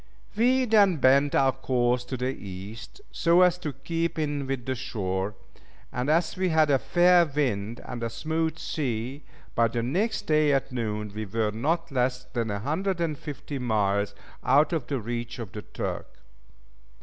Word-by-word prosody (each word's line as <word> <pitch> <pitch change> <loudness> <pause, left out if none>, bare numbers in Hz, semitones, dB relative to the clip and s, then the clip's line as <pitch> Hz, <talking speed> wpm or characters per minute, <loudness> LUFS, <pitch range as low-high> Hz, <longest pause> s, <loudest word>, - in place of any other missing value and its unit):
We 255 +4 +3
then 205 -6 +5
bent 140 +2 +4
our 135 -1 +4
course 125 -2 0
to 130 +1 -4
the 130 +2 -1
East, 100 - -9
so 170 +2 +4
as 180 -1 +3
to 155 -5 -3
keep 165 +5 -2
in 145 -3 -1
with 135 -3 -3
the 130 - -1
shore; 95 -4 -3 0.6
and 125 +3 -1
as 165 +3 +2
we 185 0 0
had 155 -2 +4
a 135 - +4
fair 175 +3 +5
wind 120 -8 -1
and 120 -2 -6
a 115 - -1
smooth 160 +6 -2
sea, 130 -2 -3 0.3
by 115 0 +3
the 115 +1 -2
next 200 - 0
day 155 -5 +3
at 135 0 0
noon, 105 -4 -3
we 110 0 -4
were 110 +1 0
not 160 +9 -1
less 125 -1 0
than 120 -2 -3
150 150 - -2
miles 105 -4 0 0.3
out 140 +6 +4
of 150 -7 -1
the 135 -1 -1
reach 120 +1 -4
of 115 -6 -6
the 105 - -6
Turk. - - -5
135 Hz, 165 wpm, -27 LUFS, 115-160 Hz, 0.6 s, then